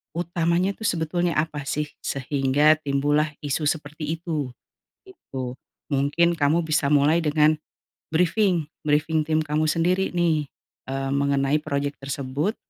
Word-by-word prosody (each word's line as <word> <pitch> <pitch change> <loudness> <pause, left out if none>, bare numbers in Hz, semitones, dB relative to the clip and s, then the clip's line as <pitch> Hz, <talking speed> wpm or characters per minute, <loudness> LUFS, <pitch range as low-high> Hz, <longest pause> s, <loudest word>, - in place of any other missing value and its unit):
utamanya 170 +2 +1
tuh 220 +1 -3
sebetulnya 170 +1 0
apa 155 -1 -1
sih, 150 +2 0 0.2
sehingga 140 +3 +2
timbul 145 0 +1
lah 155 0 +1
isu 145 +1 -1
seperti 155 +1 -2
itu. 160 -5 -3 0.6
Gitu. 130 - -7 0.3
Mungkin 150 +5 +2
kamu 155 +3 +3
bisa 155 -2 +1
mulai 150 +3 +4
dengan 155 +1 +3 0.5
brifing, 180 +1 +2 0.2
brifing 155 +1 +2
tim 155 0 +2
kamu 155 +1 0
sendiri 180 +4 +1
nih, 160 -4 +1 0.4
eee, 135 0 -2
mengenai 140 +1 +2
project 140 0 -2
tersebut, 140 - -2
155 Hz, 130 wpm, -24 LUFS, 140-165 Hz, 0.6 s, mulai